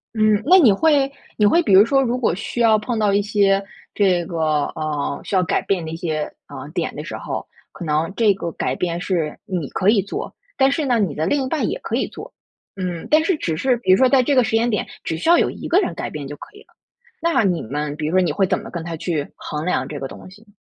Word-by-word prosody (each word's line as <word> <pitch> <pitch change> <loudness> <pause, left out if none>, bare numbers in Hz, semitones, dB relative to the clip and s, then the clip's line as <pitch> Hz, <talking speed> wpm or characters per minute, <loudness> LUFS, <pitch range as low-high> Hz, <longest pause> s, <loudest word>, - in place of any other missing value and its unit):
嗯， 215 -1 +3
那 360 +9 +6
你 245 - +6
会 280 +2 +2 0.3
你 210 - +3
会 335 +12 +5
比 200 - +1
如 200 +3 +8
说， 270 +3 +3
如 250 -1 0
果 245 -9 +1
需 235 +5 -4
要 220 -2 +5
碰 230 +2 -3
到 210 -2 +2
一 205 - +3
些 200 -1 +2 0.3
这 185 -4 +2
个， 155 -4 0
嗯， 150 -3 -3
需 195 - -3
要 185 - +3
改 175 - 0
变 180 -5 -1
的 160 - -6
一 165 - -4
些， 160 -3 -3 0.2
嗯， - - -9
点 - - -2
的 - - -5
时 - - -6
候， - - -5 0.3
可 170 - -8
能 155 +3 0
这 215 -3 +4
个 170 -3 -5
改 - - -2
变 175 -1 -2
是 170 -5 -2
你 175 -8 -3
可 190 - -2
以 210 -2 +4
做。 200 - -6 0.2
但 270 0 +4
是 300 +2 -1
呢， 245 -3 +2
你 190 -8 0
的 155 - -2
另 285 +4 +1
一 260 - -3
半 310 +1 -1
也 - - -3
可 - - -3
以 - - 0
做。 - - -10 0.4
嗯， 180 -3 -4
但 310 +1 +5
是 330 -2 +1
只 165 - -2
是 250 +9 +1
比 230 -5 +1
如 185 - +7
说 260 -1 +4
在 265 -2 +4
这 285 - +1
个 255 - +5
时 - - -3
间 230 +2 +2
点， 210 - -1 0.2
只 160 - -2
需 170 - -1
要 345 - +7
有 - - +2
一 - - -7
个 350 - +4
人 385 - -1
改 - - -5
变 145 -3 -6
就 145 - -7
可 - - -11
以 415 - -14
了。 - - -24 0.5
那 335 -7 +2
你 180 -4 +1
们 145 +4 -4
比 150 0 -3
如 - - -2
说 185 - +5
你 170 - +1
会 190 +5 +1
怎 - - +1
么 - - -9
跟 170 -2 -5
他 165 -1 -5
去 155 -4 -2
衡 150 0 -5
量 130 -7 0
这 145 -1 -6
个 135 - -4
东 - - -12
西？ 210 +3 -18
195 Hz, 295 characters per minute, -21 LUFS, 165-240 Hz, 0.5 s, 如